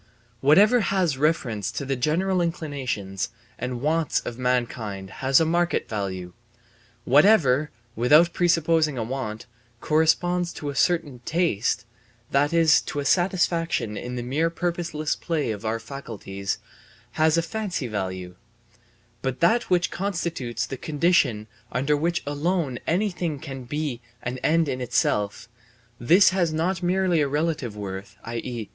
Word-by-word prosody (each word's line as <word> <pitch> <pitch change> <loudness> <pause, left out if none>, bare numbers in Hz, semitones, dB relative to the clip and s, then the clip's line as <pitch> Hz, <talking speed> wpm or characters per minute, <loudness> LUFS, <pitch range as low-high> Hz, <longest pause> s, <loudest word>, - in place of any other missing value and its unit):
Whatever 200 - +5
has 190 - +1
reference 130 - 0
to 140 - -4
the 135 0 -1
general 175 +8 +1
inclinations 135 - -3 0.3
and 125 0 -4
wants 160 +2 +1
of 120 - -6
mankind 115 -6 -2
has 135 0 +5
a 165 - +3
market 175 +2 +1
value; 95 -4 -4 0.7
whatever, 150 - +5 0.3
without 150 +9 +5
presupposing 165 -4 +2
a 115 - -1
want, 115 -2 -4 0.3
corresponds 170 +4 +2
to 145 -1 -4
a - - -10
certain 155 -5 +1
taste, 155 - 0 0.5
that 145 +2 +3
is 165 -2 +5
to 145 - -5
a 140 - -3
satisfaction 170 - +1
in 125 +3 -5
the 120 - -3
mere 150 +7 0
purposeless 170 -3 -2
play 155 -8 -2
of 105 0 -6
our 115 +1 -1
faculties, 100 -8 -5 0.5
has 155 +1 +2
a 165 - +2
fancy 195 - -3
value; 95 -5 -4 0.9
but 130 -1 -3
that 225 +8 +3
which 180 -1 +2
constitutes 170 - -2
the 135 - -6
condition 145 -8 +1 0.3
under 135 +5 +1
which 170 +3 -1
alone 145 -2 -1
anything 175 -3 0
can 135 -3 -8
be 145 -2 -3 0.2
an 125 +1 -4
end 165 +3 +2
in 130 -2 -3
itself, 105 -4 0 0.5
this 180 +11 +5
has 180 -4 +1
not 170 +3 -1
merely 180 -2 +2
a 145 - +2
relative 145 -6 -2
worth, 95 -1 -6
i.e. 115 -1 -5
150 Hz, 140 wpm, -25 LUFS, 120-170 Hz, 0.9 s, Whatever